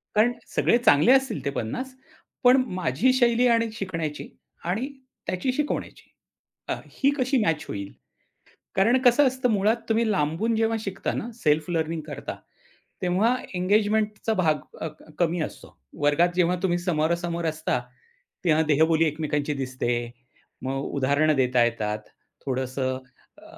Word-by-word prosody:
कारण 225 +3 +4 0.2
सगळे 235 - +4
चांगले 230 - +5
असतील 265 -5 +2
ते - - +1
50, 145 - -4 0.5
पण 255 +1 +6
माझी 185 - +2
शैली 245 -1 +3
आणि 230 -1 +3
शिकण्याची 165 -8 -4 0.4
आणि 215 +10 -1 0.4
त्याची 185 +8 -1
शिकवण्याची, 295 +2 -3 0.6
अ, - - +2 0.2
ही 275 - +2
कशी 260 +1 +1
मॅच 160 -2 0
होईल? 100 -1 -5 0.8
कारण 225 +7 +4
कसं 260 +2 +5
असतं, 255 -1 0
मुळात 210 +2 +3
तुम्ही 225 0 +2
लांबून 190 +7 0
जेव्हा 225 0 +1
शिकता 195 -2 -3
ना, 235 - -4
सेल्फ 155 +3 +2
लर्निंग 165 -1 -1
करता, 145 -1 -6 0.7
तेव्हा 200 +8 +2 0.2
एंगेजमेंटचा 210 +3 +1
भाग 155 -6 +2 0.2
अ, 160 - -2
क 155 +1 -17
कमी 170 0 +1
असतो. - - -8 0.3
वर्गात 145 +4 +4
जेव्हा 180 0 +3
तुम्ही 175 -2 +1
समोरासमोर 170 0 -1
असता, 155 -5 -1 0.6
तेव्हा 160 -1 +4
देहबोली 160 +2 +3
एकमेकांची 150 -1 -1
दिसते, 130 -2 -2 0.7
मग 135 +1 -2
उदाहरणं 145 +3 +2
देता 125 -2 +3
येतात, 110 -2 -1 0.5
थोडंसं 130 0 -2 0.4
अ, 315 - -16
175 Hz, 135 wpm, -25 LUFS, 150-225 Hz, 0.8 s, पण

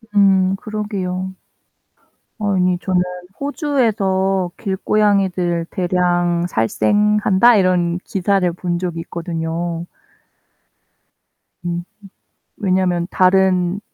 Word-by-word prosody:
음 195 -2 +4
그러게요. 190 -3 -4 1.1
아니 185 -3 +1
저는 185 -1 +1 0.4
'호주에서 200 - 0
길고양이들 190 -3 0
대량 175 -1 +1
살생한다.' 210 - +3
이런 180 -3 +2
기사를 195 -1 +1
본 175 0 -3
적이 175 -2 -3
있거든요. 165 0 -4 1.8
음. 175 0 -2 0.7
왜냐면 185 -4 0
다른 185 -1 +3
185 Hz, 180 characters per minute, -19 LUFS, 175-200 Hz, 1.8 s, 음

